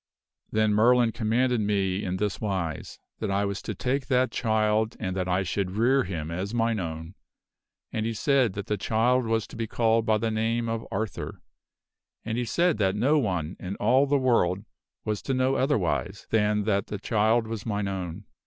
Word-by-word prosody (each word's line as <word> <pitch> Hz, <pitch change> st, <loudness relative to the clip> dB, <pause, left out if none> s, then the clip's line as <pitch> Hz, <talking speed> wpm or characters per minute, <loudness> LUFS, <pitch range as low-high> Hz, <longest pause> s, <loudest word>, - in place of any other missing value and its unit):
"Then 110 Hz, -1 st, +2 dB
Merlin 120 Hz, +2 st, +4 dB
commanded 120 Hz, +1 st, +1 dB
me 100 Hz, -2 st, 0 dB
in 95 Hz, 0 st, -2 dB
this 105 Hz, 0 st, -2 dB
wise: 95 Hz, -7 st, -3 dB, 0.2 s
that 110 Hz, -, -2 dB
I 100 Hz, +1 st, +1 dB
was 100 Hz, -1 st, -3 dB
to 110 Hz, -, -5 dB
take 130 Hz, +6 st, -1 dB
that 130 Hz, -1 st, +2 dB
child 110 Hz, -1 st, +1 dB
and 95 Hz, -3 st, -3 dB
that 90 Hz, -1 st, -1 dB
I 95 Hz, +1 st, +1 dB
should 95 Hz, +1 st, -1 dB
rear 130 Hz, +3 st, +3 dB
him 85 Hz, -4 st, -4 dB
as 95 Hz, +6 st, -3 dB
mine 115 Hz, -2 st, +1 dB
own; 80 Hz, -1 st, -5 dB, 0.8 s
and 110 Hz, -, -1 dB
he 115 Hz, 0 st, -2 dB
said 130 Hz, -3 st, +2 dB
that 100 Hz, 0 st, -5 dB
the 105 Hz, -, -1 dB
child 115 Hz, +5 st, +1 dB
was 115 Hz, -1 st, +1 dB
to -, -, -13 dB
be 115 Hz, 0 st, -3 dB
called 115 Hz, 0 st, +1 dB
by 110 Hz, -1 st, +4 dB
the 110 Hz, +1 st, -1 dB
name 115 Hz, +2 st, 0 dB
of 115 Hz, 0 st, -3 dB
Arthur; 110 Hz, +1 st, -4 dB, 0.9 s
and 110 Hz, 0 st, -2 dB
he 120 Hz, 0 st, -1 dB
said 170 Hz, +5 st, +1 dB
that 95 Hz, -1 st, +2 dB
no 145 Hz, +8 st, +3 dB
one 90 Hz, -, -2 dB
in 95 Hz, +2 st, -5 dB
all 130 Hz, +7 st, +3 dB
the 145 Hz, +1 st, +3 dB
world 105 Hz, -7 st, +2 dB, 0.4 s
was 105 Hz, -2 st, -2 dB
to 135 Hz, -, -1 dB
know 130 Hz, +1 st, +2 dB
otherwise 95 Hz, -, 0 dB
than 105 Hz, -1 st, +2 dB
that 100 Hz, -1 st, 0 dB
the 105 Hz, -, -4 dB
child 110 Hz, +2 st, +2 dB
was 110 Hz, -2 st, -5 dB
mine 105 Hz, -3 st, -2 dB
own. 95 Hz, -1 st, -4 dB
110 Hz, 190 wpm, -26 LUFS, 100-115 Hz, 0.9 s, Merlin